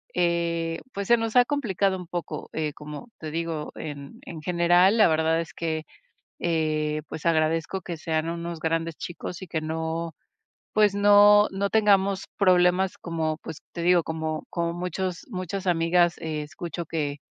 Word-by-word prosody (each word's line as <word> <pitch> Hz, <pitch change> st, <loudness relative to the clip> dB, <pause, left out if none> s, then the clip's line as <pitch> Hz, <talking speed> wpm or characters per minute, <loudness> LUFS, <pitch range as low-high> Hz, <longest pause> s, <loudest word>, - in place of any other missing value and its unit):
eh, 170 Hz, -1 st, 0 dB
pues, 200 Hz, -1 st, -4 dB
se 235 Hz, -, +7 dB
nos 225 Hz, +1 st, -3 dB
ha 245 Hz, -, +7 dB
complicado 200 Hz, -9 st, 0 dB
un 180 Hz, -2 st, -9 dB
poco. 170 Hz, -4 st, -5 dB
Eh, 155 Hz, -2 st, -2 dB
como 150 Hz, -, -9 dB
te 155 Hz, -, -5 dB
digo, 165 Hz, -2 st, -3 dB
en 140 Hz, -2 st, -7 dB
en 160 Hz, -3 st, -8 dB
general, 175 Hz, +4 st, +4 dB
la 215 Hz, -, +7 dB
verdad 160 Hz, +1 st, +2 dB
es 165 Hz, -, -8 dB
que, 160 Hz, -1 st, -2 dB, 0.6 s
eh, 155 Hz, -2 st, 0 dB
pues, 160 Hz, -, -7 dB
agradezco 165 Hz, +3 st, +1 dB
que 170 Hz, -1 st, -5 dB
sean 160 Hz, 0 st, -1 dB
unos 170 Hz, -1 st, -5 dB
grandes 165 Hz, 0 st, -1 dB
chicos 175 Hz, +1 st, -7 dB
y 185 Hz, -, -7 dB
que 160 Hz, -1 st, -2 dB
no, 160 Hz, +1 st, -3 dB, 0.6 s
pues, 210 Hz, -2 st, +4 dB
no 205 Hz, +1 st, +7 dB
no 195 Hz, +1 st, -1 dB
tengamos 200 Hz, -3 st, +3 dB
problemas 180 Hz, -1 st, +3 dB
como, 160 Hz, -2 st, -2 dB
pues, 160 Hz, -, -8 dB
te 170 Hz, -, -5 dB
digo, 175 Hz, 0 st, +4 dB
como 160 Hz, -1 st, -3 dB
como 170 Hz, -1 st, -1 dB
muchos 180 Hz, 0 st, -4 dB
muchas 185 Hz, -1 st, -4 dB
amigas 175 Hz, 0 st, +3 dB
e 155 Hz, -2 st, -3 dB
escucho 170 Hz, +3 st, -6 dB
que 150 Hz, -3 st, -2 dB
170 Hz, 165 wpm, -26 LUFS, 160-185 Hz, 0.6 s, se